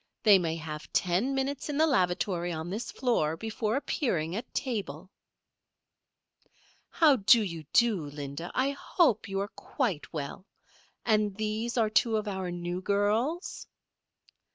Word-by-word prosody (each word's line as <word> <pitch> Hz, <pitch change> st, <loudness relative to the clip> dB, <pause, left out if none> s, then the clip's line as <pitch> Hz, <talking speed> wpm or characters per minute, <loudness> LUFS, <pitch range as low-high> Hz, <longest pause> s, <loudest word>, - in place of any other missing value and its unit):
They 205 Hz, -4 st, +7 dB
may 165 Hz, -2 st, -1 dB
have 155 Hz, -1 st, -7 dB
ten 190 Hz, +10 st, +1 dB
minutes 270 Hz, +2 st, -2 dB
in 290 Hz, -, -2 dB
the 315 Hz, -, +5 dB
lavatory 180 Hz, -, +1 dB
on 160 Hz, +1 st, -4 dB
this 220 Hz, +5 st, -4 dB
floor 165 Hz, -, 0 dB
before 220 Hz, +2 st, -2 dB
appearing 185 Hz, -, -1 dB
at 225 Hz, -, -5 dB
table." 195 Hz, -, -4 dB, 1.8 s
"How 305 Hz, -5 st, +5 dB
do 225 Hz, +2 st, +6 dB
you 165 Hz, -5 st, -5 dB
do, 215 Hz, -10 st, +3 dB
Linda? 145 Hz, +3 st, -6 dB
I 265 Hz, +2 st, +2 dB
hope 280 Hz, -, +1 dB
you 195 Hz, 0 st, -2 dB
are 200 Hz, -, -2 dB
quite 220 Hz, -, -3 dB
well. 150 Hz, +4 st, -6 dB, 0.6 s
And 215 Hz, -3 st, +2 dB
these 220 Hz, +3 st, -2 dB
are 220 Hz, -2 st, +2 dB
two 220 Hz, 0 st, +3 dB
of 215 Hz, 0 st, -3 dB
our 190 Hz, -2 st, -3 dB
new 175 Hz, +1 st, -4 dB
girls?" 215 Hz, -, 0 dB
205 Hz, 140 wpm, -29 LUFS, 175-235 Hz, 1.8 s, They